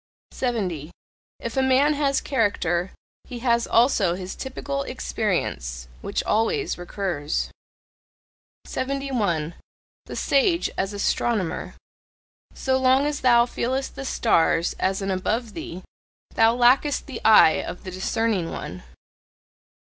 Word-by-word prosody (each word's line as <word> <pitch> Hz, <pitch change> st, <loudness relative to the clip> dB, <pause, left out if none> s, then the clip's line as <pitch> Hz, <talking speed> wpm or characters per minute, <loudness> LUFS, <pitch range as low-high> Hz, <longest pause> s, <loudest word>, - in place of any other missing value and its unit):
70. 190 Hz, -, -2 dB, 0.5 s
If 235 Hz, -, -5 dB
a 265 Hz, -, +3 dB
man 265 Hz, +3 st, +4 dB
has 280 Hz, -2 st, +1 dB
character, 190 Hz, -, 0 dB, 0.4 s
he 250 Hz, -, -7 dB
has 235 Hz, -1 st, +2 dB
also 225 Hz, -7 st, +3 dB
his 185 Hz, 0 st, -6 dB
typical 275 Hz, +1 st, -4 dB
experience, 175 Hz, -, -3 dB
which -, -, -2 dB
always 225 Hz, -, 0 dB
recurs. 175 Hz, -4 st, -3 dB, 1.1 s
71. 245 Hz, -, -2 dB, 0.5 s
THE -, -, -7 dB
SAGE 335 Hz, +5 st, +2 dB
AS 195 Hz, +2 st, -2 dB
ASTRONOMER. 205 Hz, -1 st, -1 dB, 0.8 s
So 260 Hz, -1 st, +1 dB
long 260 Hz, +2 st, +4 dB
as 295 Hz, -1 st, -2 dB
thou 240 Hz, -2 st, +5 dB
feelest 260 Hz, +2 st, -2 dB
the 275 Hz, -, -6 dB
stars 170 Hz, -9 st, +2 dB
as 190 Hz, +1 st, 0 dB
an 195 Hz, -, -1 dB
"above 215 Hz, +4 st, -1 dB
thee," 180 Hz, +2 st, -7 dB, 0.5 s
thou 225 Hz, +1 st, +4 dB
lackest 255 Hz, +4 st, +3 dB
the 275 Hz, -, -7 dB
eye 215 Hz, -7 st, +6 dB
of -, -, -7 dB
the 185 Hz, -, -6 dB
discerning 190 Hz, -1 st, -1 dB
one. 90 Hz, +1 st, -6 dB
225 Hz, 115 wpm, -24 LUFS, 185-265 Hz, 1.1 s, eye